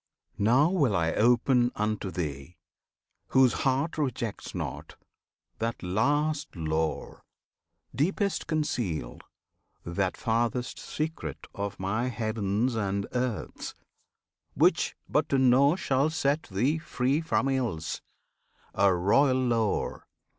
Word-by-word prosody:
Now 125 - +4
will 140 - +2
I 80 -2 +1
open 120 +1 +3
unto 105 -2 -1
thee 80 -2 -5 0.7
whose 130 -3 +4
heart 140 +5 0
Rejects 120 -9 -3
not 75 -2 -5 0.6
that 115 -1 -3
last 145 +11 0
lore, 80 -1 -2 0.7
deepest 195 - 0
concealed, 120 - -2 0.6
That 90 +2 -1
farthest 120 +2 -1
secret 155 - -4
of 100 0 -4
My 110 +6 -1
Heavens 110 0 -1
and 100 -2 -1
Earths, 125 -4 -3 0.8
Which - - +3
but - - +1
to 135 - +2
know 130 +4 +5
shall 140 -4 +1
set 155 -1 0
thee 125 +11 +1
free 135 -1 0
from 160 -4 0
ills, 120 -12 -2 0.7
A 100 0 +4
royal 130 +9 +3
lore! 115 -4 0
120 Hz, 105 wpm, -28 LUFS, 100-135 Hz, 0.8 s, know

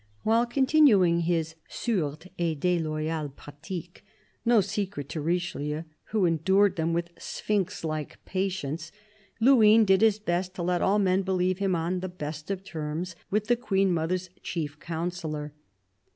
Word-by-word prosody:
While 230 +2 +3
continuing 240 - +4
his 165 -1 0 0.2
sourdes 165 -9 -2
et 165 -3 0
deloyales 155 -3 -1
pratiques 165 +4 -8 0.2
— - - -39
no 230 - +7
secret 195 -7 -2
to 155 - -4
Richelieu, 160 -2 -2 0.2
who 210 -4 +1
endured 190 +4 +3
them 165 0 0
with 170 +1 -1
sphinx 205 -3 -2
like 155 -2 -4
patience 175 -5 -3 0.2
— 200 +1 -32
Luynes 225 -3 +6
did 190 0 +4
his 220 -2 +5
best 185 -2 -2
to 175 - -3
let 180 0 +1
all 200 +2 +3
men 190 -2 +3
believe 185 -1 0
him 195 -2 +1
on 170 +2 -1
the 185 +1 -4
best 155 -2 -6
of 195 -1 -3
terms 165 0 -4
with 210 +1 +1
the 240 +2 +3
Queen 195 -5 +1
mother's 175 +2 -1
chief 150 -3 -4
counsellor. 160 -3 -4
180 Hz, 150 wpm, -27 LUFS, 160-195 Hz, 0.2 s, no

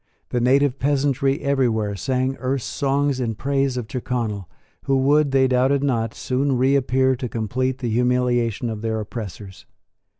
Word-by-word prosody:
The 120 - -1
native 135 +2 +3
peasantry 140 -1 +1
everywhere 120 -7 0
sang 130 +4 -1
Erse 130 -1 -1
songs 140 -1 0
in 115 -3 -2
praise 135 +2 0
of 120 -3 -4
Tyrconnel, 115 -6 -3 0.4
who 135 - +2
would, 145 +2 +3
they 135 -1 +3
doubted 130 +2 +2
not, 115 -5 -1
soon 135 +1 0
reappear 130 0 +2
to 125 0 -5
complete 125 +4 -2
the 125 -3 -3
humiliation 120 -1 +1
of 105 -1 -6
their 110 -1 -1
oppressors. 105 -3 -8
130 Hz, 145 wpm, -22 LUFS, 115-135 Hz, 0.4 s, native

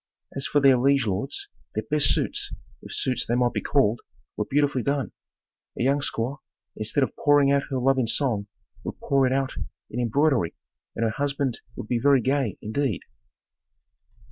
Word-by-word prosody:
As 135 0 -1
for 145 - +3
their 135 -3 +5
liege 135 0 +3
lords, 105 +7 -2 0.3
their 110 - -1
best 150 -2 +4
suits, - - 0 0.3
if - - -11
suits 125 -1 0
they 120 - -1
might 125 -1 +2
be - - -1
called, 120 -5 +2 0.3
were - - -2
beautifully 145 -2 +2
done. 140 +2 -1 0.7
A - - 0
young 140 +2 +3
squaw, 135 -1 -2 0.4
instead 115 +6 0
of - - -2
pouring 145 -1 +4
out 140 0 +3
her 135 - -1
love 135 +1 +3
in 120 - +1
song, 110 -4 0 0.4
would - - -6
pour 135 -2 +2
it - - 0
out 135 0 0 0.4
in 120 - -3
embroidery 125 - +2 0.4
and 115 - -1
her 110 - +1
husband 140 -1 -1
would - - -7
be 120 0 0
very 140 +2 +5
gay, 130 -3 0
indeed. 110 - -1
135 Hz, 175 wpm, -25 LUFS, 115-140 Hz, 0.7 s, their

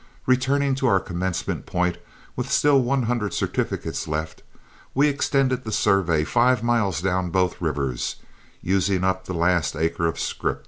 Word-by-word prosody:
Returning 135 +2 +2
to 135 - +3
our 95 -5 +4
commencement 90 0 -3
point 90 -1 -1 0.4
with - - -4
still 145 -2 +4
one 130 +1 +1
hundred 115 -4 -1
certificates - - -2
left, 80 +1 -4 0.5
we 140 +3 +4
extended 135 -3 +1
the 110 - -5
survey 85 -7 +2
five 120 +5 +2
miles 110 -8 +1
down 90 -1 0
both 90 +1 0
rivers, 70 -6 -2 0.5
using 95 0 +1
up 95 0 0
the 95 - -5
last 85 -2 +1
acre 80 +1 0
of 80 - -3
scrip. - - -2
95 Hz, 150 wpm, -23 LUFS, 85-125 Hz, 0.5 s, our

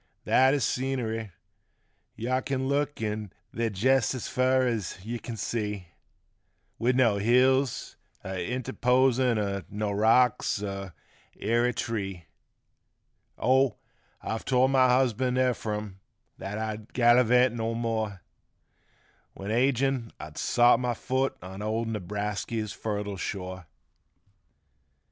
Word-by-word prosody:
That 130 +2 +4
is 135 -6 +1
scenery 120 -4 -2 0.4
— - - -46
yuh 130 +3 -1
kin 130 -1 -2
look 145 +1 0
there 110 +1 -4
jest 130 +6 +2
as 125 - -5
fur 130 0 +2
as 110 -8 -2
yuh 120 +1 -4
kin 115 -1 -7
see 105 -4 -3 0.9
With 125 +2 +2
no 115 -5 +3
hills 130 +4 +2 0.3
a 95 -1 -3
interposin' 125 0 +2
er 100 -2 -2
no 105 0 -2
rocks, 110 0 +3
er 100 -2 -5 0.5
airy 120 +2 +2
tree, 95 -8 -4 1.1
Oh, 130 -2 +3 0.5
I've 110 - -3
told 130 0 +3
my 130 -1 +5
husband, 125 0 +2
Ephrum, 105 -6 -1 0.4
that 100 +2 -5
I'd 110 0 -5
gallavant 125 0 +5
no 115 -1 -2
more 110 -4 -2 1.1
When 100 +2 -5
ag'in 130 0 +1
I'd 75 0 -9
sot 120 +1 +4
my 125 -1 -1
foot 130 +3 -1
on 95 +2 -8
old 110 +2 -1
Newbrasky's 105 +1 -3
fertile 105 -2 -4
shore. 90 -1 -5
115 Hz, 115 wpm, -27 LUFS, 105-130 Hz, 1.1 s, my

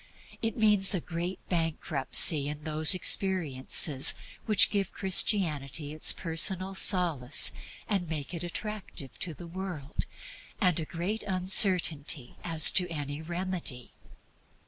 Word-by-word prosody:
It 225 +1 -5
means 210 -3 +4
a - - -3
great 175 +2 -8
bankruptcy 155 -3 +1
in 150 0 -9
those 155 +3 +2
experiences 155 -7 +3 0.3
which 210 -4 +4
give 200 -2 -4
Christianity 160 -7 -2
its 155 - 0
personal 185 +3 -2
solace 165 -9 +4 0.4
and 190 -6 -4
make 155 0 -7
it 170 0 -6
attractive 180 -6 -8
to 165 -3 -6
the 175 - -13
world, 170 -5 -8 0.5
and 180 -5 0
a 160 - -6
great 180 +8 -6
uncertainty 180 - +2
as 165 -3 +5
to 180 -1 +1
any 145 -2 -7
remedy. 170 -7 -5
170 Hz, 120 wpm, -26 LUFS, 150-190 Hz, 0.5 s, as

